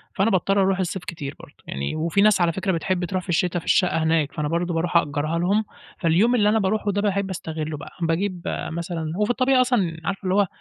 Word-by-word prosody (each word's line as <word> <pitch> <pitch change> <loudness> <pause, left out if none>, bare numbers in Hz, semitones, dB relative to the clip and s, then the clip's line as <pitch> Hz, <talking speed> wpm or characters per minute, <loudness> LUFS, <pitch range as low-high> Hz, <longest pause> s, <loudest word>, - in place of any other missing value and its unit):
فأنا 195 +4 +2
باضطّر 195 0 +2
أروح 190 0 +2
الصيف 185 0 -2
كتير 145 -5 -6
برضه، - - -14
يعني 70 - -3
وفي 165 +5 +1
ناس 210 -2 +4
على 170 -1 +3
فكرة 190 +2 -1
بتحب 180 +1 -1
تروح 185 +1 -3
في 180 - -14
الشتا 175 +1 +1
في - - -14
الشقة 180 -3 +3
هناك، 160 -3 +1
فأنا 150 -1 -2
برضه 170 +2 -1
باروح 170 +1 +1
أأجرها 155 +1 0
لهم 200 +5 +1 0.3
فاليوم 190 +8 +3
اللي 210 -3 +3
أنا 220 +1 +3
باروحه 205 +1 0
ده 200 +1 0
باحب 200 -1 0
أستغلّه 155 -4 -4
بقى، 145 - -10
باجيب 175 +2 -1 0.3
مثلًا 165 -1 -4
هو 210 - +2
في 245 - 0
الطبيعي 255 +1 +3
أصلًا 205 -10 +1
عارفة 195 0 -2
اللي 185 0 0
هو 200 -1 +3
180 Hz, 225 wpm, -23 LUFS, 165-200 Hz, 0.3 s, ناس